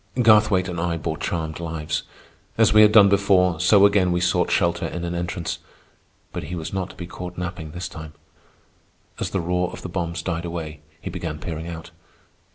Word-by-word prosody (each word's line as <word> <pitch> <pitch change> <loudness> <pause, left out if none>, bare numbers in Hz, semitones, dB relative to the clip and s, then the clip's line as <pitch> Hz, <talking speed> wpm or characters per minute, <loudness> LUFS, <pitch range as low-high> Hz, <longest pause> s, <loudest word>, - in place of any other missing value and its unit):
Garthwaite 105 -5 +5
and 85 -3 -3
I 85 -1 -1
bore 80 - -4
charmed 80 -2 -3
lives. 80 -3 -3 0.6
As - - +4
we 105 - +8
had 105 0 +7
done 105 -2 +8
before, 95 -3 +3
so 100 +2 +6
again 100 -3 +3
we 90 - +1
sought 90 0 +1
shelter 85 0 +1
in 85 - -5
an 85 - -3
entrance. 85 0 -3 0.7
But - - -4
he 90 +4 -5
was 80 0 -5
not 95 -1 -2
to - - -13
be 90 - -7
caught 90 0 -8
napping 85 -2 -5
this 90 +2 -5
time. 80 -2 -9 1.1
As - - -2
the 95 - -1
roar 90 +1 0
of - - -10
the - - -5
bombs 85 -2 -3
died 85 -2 -2
away, 80 -3 -5 0.2
he 95 - -6
began 85 -3 -4
peering 80 0 -6
out. 85 -1 -8
85 Hz, 195 wpm, -23 LUFS, 85-95 Hz, 1.1 s, we